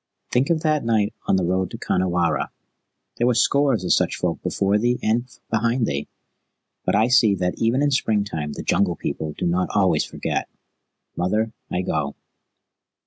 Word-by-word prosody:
"Think 125 +2 +2
of 165 -2 +2
that 155 -2 +1
night 110 -2 +1
on - - +3
the 95 -2 +1
road 95 +1 0
to - - -7
Khanhiwara. 90 -2 0 0.7
There 120 - +2
were 125 - +3
scores 135 -5 +3
of 90 - +3
such - - +2
folk - - -2
before 100 +2 +1
thee 120 +2 +1
and 115 +3 +1 0.2
behind 115 +2 +1
thee. 70 -6 -3 0.8
But - - +1
I 110 +2 +4
see 120 -5 +5
that 90 -1 -1
even 120 +5 +2
in 145 - +2
springtime 100 - 0
the - - -6
Jungle 90 -4 +1
People 75 0 -4
do - - -2
not 90 +1 +1
always - - +3
forget. - - -3 0.7
Mother, 110 +5 0 0.2
I 90 - -1
go." 75 -5 -2
105 Hz, 170 wpm, -23 LUFS, 90-120 Hz, 0.8 s, see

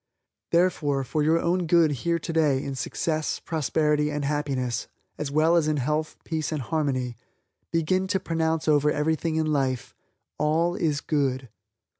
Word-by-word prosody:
Therefore, 155 -6 +2
for 150 +4 -1
your 160 +2 +3
own 175 +1 0
good 165 -2 +4
here 170 +5 0
today 155 -5 +1
in 140 - -4
success, 155 +4 -2
prosperity 150 -1 0
and 145 -1 -2
happiness 135 -5 -1 0.3
as 150 - -2
well 155 +4 +3
as 165 -3 +3
in 155 -1 +1
health, 150 +4 -1
peace 160 -1 -2
and 150 -4 -2
harmony, 130 -5 -1 0.6
begin 185 +3 +1
to 190 0 +1
pronounce 160 -2 -1
over 150 -1 +4
everything 160 +2 0
in 155 -1 +1
life, 130 -3 -1 0.5
All 160 +3 +2
is 150 -5 0
Good. 135 -4 -1
155 Hz, 150 wpm, -26 LUFS, 145-165 Hz, 0.6 s, good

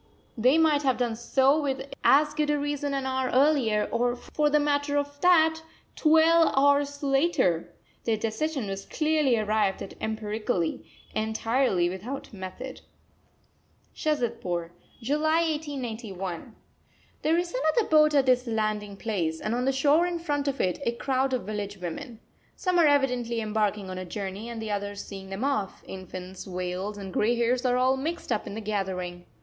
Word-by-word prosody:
They 255 +6 +4
might 310 -3 +4
have 265 -3 +1
done 240 -2 0
so 265 +5 +3
with 270 -2 -2 0.2
as 300 +2 +5
good 300 -1 0
a 295 - +2
reason 290 -1 -2
an 270 -1 -2
hour 260 -1 -1
earlier, 255 -6 +3
or, 245 +1 +1
for 295 +4 -1
the 300 0 +4
matter 290 0 +1
of 285 0 -3
that, 320 -3 +4 0.3
twelve 325 +1 +5
hours 285 +1 +3
later! 270 - +2 0.3
Their 225 -2 +1
decision 235 +5 -2
was 195 0 -4
clearly 305 -5 +2
arrived 215 -2 0
at - - -9
empirically, 215 -4 -2 0.3
entirely 220 -3 +1
without 220 +10 -6
method. 205 +7 -7 1.1
SHAZADPUR, 230 - -2 0.3
July 310 +5 +2
1891. 225 - -5 0.7
There 320 +2 +2
is 350 0 -2
another 315 - +1
boat 305 -1 +5
at 275 -2 +4
this 255 -1 +3
landing 215 -2 -2
place, 175 -8 -2
and 215 - -2
on 250 +1 0
the 270 - +3
shore 290 +6 +3
in 350 -1 -2
front 290 -4 -2
of 275 -1 -1
it 180 -1 0
a 235 - 0
crowd 265 +2 0
of 255 -2 -1
village 205 0 -4
women. 215 - -6 0.4
Some 365 -2 +1
are 325 - +6
evidently 250 -5 +1
embarking 210 -2 -1
on 185 - -5
a 185 - -5
journey 200 +3 -5
and 235 -1 -6
the 220 -1 -4
others 205 0 -4
seeing 195 -1 -9
them 195 +5 -4
off; 270 -9 -1
infants, 185 0 -8
veils, 185 +2 -4
and 195 -2 -7
grey 230 +3 +2
hairs 240 +2 +1
are 250 0 +2
all 260 +1 +3
mixed 320 +1 -4
up 215 - -1
in 200 - -6
the 220 - -4
gathering. 185 -4 -3
245 Hz, 165 wpm, -27 LUFS, 205-285 Hz, 1.1 s, are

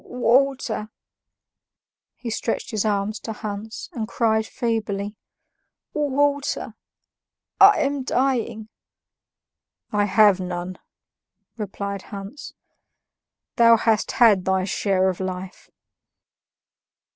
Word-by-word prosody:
"Water!" 250 -3 +1 1.3
he 235 - -6
stretched 225 - -3
his 215 -3 0
arms 210 0 -1
to 225 - -6
Hans, 215 +1 -6
and 220 -3 -3
cried 220 -1 +1
feebly, 215 -4 -2 0.8
"Water! 285 -1 0 0.9
I 400 +1 +7
am 280 0 0
dying." 245 -5 -1 1.2
"I 205 -1 +2
have 205 -1 +5
none," 180 0 -5 0.8
replied 200 -2 -5
Hans; 200 +7 -8 1.0
"thou 230 -1 +7
hast 220 -1 +1
had 215 -6 +5
thy 190 0 +1
share 190 -1 +1
of 185 -2 -1
life." 185 0 -6
215 Hz, 90 wpm, -23 LUFS, 200-240 Hz, 1.3 s, I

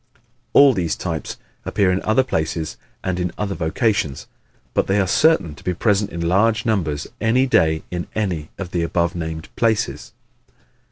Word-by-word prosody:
All 140 -1 +7
these 85 -6 -1
types 80 -3 -4 0.3
appear 100 -3 +1
in 90 - 0
other 110 +4 +3
places 80 -7 -2 0.3
and 95 -1 -1
in 90 -1 -1
other 100 -1 -2
vocations, 80 - 0 0.5
but - - +1
they 100 +1 +2
are 95 - +3
certain 120 - +3
to - - -15
be 90 - -1
present 105 +1 +1
in 85 0 -3
large 110 +4 +2
numbers 85 -10 0 0.2
any 125 +4 +3
day 80 -11 +2
in 90 -1 -3
any 90 -8 -2
of 95 -2 -6
the 85 - 0
above 85 +1 0
named 80 -2 -6
places. 110 -2 0
90 Hz, 165 wpm, -21 LUFS, 85-110 Hz, 0.5 s, All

